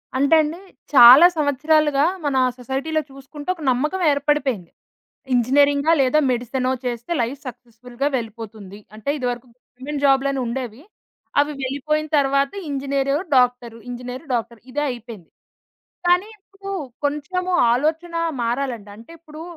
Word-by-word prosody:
అంటే 280 +4 +4
అండీ, 310 +2 -3 0.4
చాలా 260 +4 +10
సంవత్సరాలుగా 295 0 +2 0.2
మన 285 -2 0 0.2
సొసైటీలో 270 +5 -2
చూసుకుంటే 275 +3 -10
ఒక 330 - -14
నమ్మకవేర్పడిపోయింది. 285 - 0 0.6
ఇంజినీరింగా 280 +5 +3
లేదా 265 +3 +3
మెడిసెనో 255 +1 -1
చేస్తే 240 +5 -4
లైఫ్ 245 +5 -3
సక్సెస్‌ఫుల్‌గా 245 +1 -6
వెళ్ళిపోతుంది. 220 -4 -8 0.2
అంటే, 220 +5 -9
ఇదివరకు 245 -1 -3
గవర్నమెంట్ 270 +3 -8
జాబులనుండేవి. 265 -3 0 0.6
అవి 290 +1 0
వెళ్ళిపోయిన 295 +4 -1
తరవాత 275 0 +2 0.2
ఇంజినీరు, 275 0 -1 0.2
డాక్టరు, 245 -2 +1
ఇంజినీరు, 250 +3 -7
డాక్టరు, 235 -1 -3
ఇదే 290 +3 -2
అయిపోయింది, 230 -7 -9 0.8
కానీ 360 +4 +3
ఇప్పుడూ 395 0 -11 0.3
కొంచము 355 +6 -2 0.2
ఆలోచనా 325 +6 -1 0.2
మారాలండి. 235 -3 -3
అంటే, 230 +8 -14
ఇప్పుడూ 310 -1 -11
270 Hz, 110 wpm, -21 LUFS, 245-295 Hz, 0.8 s, చాలా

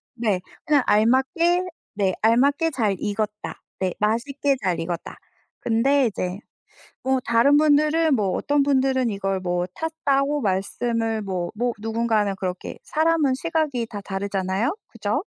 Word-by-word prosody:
네. 215 -6 0 0.2
그냥 290 -3 +3
알맞게 265 - +3 0.3
네 195 -2 +1
알맞게 280 +8 +3
잘 220 -8 0
익었다. 210 0 -3 0.2
네. 185 -2 0
맛있게 270 +6 +1
잘 180 -3 0
익었다. 170 0 -5 0.4
근데 260 +4 +3
이제 185 -3 -3 0.6
뭐 265 0 +1
다른 235 +5 +4
분들은 305 +1 +4
뭐 205 -6 +1
어떤 290 0 +1
분들은 265 -2 +2
이걸 195 -1 -2
뭐 175 -1 -1
탔다고 295 -3 0
말씀을 225 +3 -1
뭐 185 -3 -3
뭐 240 +3 0
누군가는 220 -2 0
그렇게 185 -1 -5
사람은 315 -3 +2
시각이 300 -5 -1
다 215 -3 -7
다르잖아요. 195 - -2
그죠? 230 - -2
230 Hz, 275 characters per minute, -23 LUFS, 200-285 Hz, 0.6 s, 다른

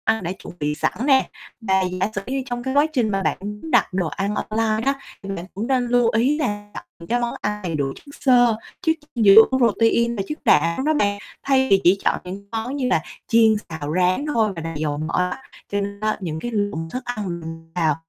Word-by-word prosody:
Ăn 220 -2 +1
đã 170 - -2
chuẩn 190 -2 -10
bị 150 0 -1
sẵn - - 0
nè. 270 -2 +4 0.3
Và 190 -3 +2
giả 185 +2 -1
sử 195 - -1
như 265 +1 -2
trong 245 -2 -4
cái 265 +1 -2
quá 290 +2 +5
trình 240 -6 +1
mà 195 -1 -1
bạn - - 0
muốn 210 +10 -6
đặt - - +3
đồ 180 -3 0
ăn 200 +5 -2
online 220 +1 -1
á, 275 +1 +2 0.3
thì 195 - -7
bạn 175 -1 -6
cũng 210 +5 -4
nên 255 -2 +1
lưu 240 -1 +3
ý 265 +6 +2
là 205 -6 -3
đặt - - -8 0.2
cái 240 - +2
món 240 -1 -2
ăn 210 0 -2
đầy 170 -3 -2
đủ 145 -2 0
chất 285 - -14
xơ, 245 -4 +5 0.3
chất 320 - +2 0.2
dinh 235 - +1
dưỡng 205 +3 +9
protein 235 0 +2
và 200 - -2
chất 300 - -4
đạm 170 - +3
đó 310 - +3
bạn, 205 -8 +1 0.3
thay 265 -1 +3
vì 195 -1 +5
chỉ 185 +3 +5
chọn - - +2
những 190 +2 -8
món 225 +4 -3
như 260 -3 0
là 160 - +2 0.3
chiên, 225 -1 +5
xào, 155 -2 -4
rán 185 +9 +2
thôi 220 -3 +2
và 165 0 -5
dầu 150 -1 -2
mỡ 155 +1 -4 0.2
á. 265 - -7 0.3
Cho 205 0 -1
nên 200 0 -5
á 215 0 0
những 160 -4 -4
cái 240 - -4
lượng 205 -7 -2
thức 255 - -3
ăn 205 -8 -4
mình 165 0 -9
vào 160 -4 +2
210 Hz, 240 wpm, -22 LUFS, 180-245 Hz, 0.3 s, dưỡng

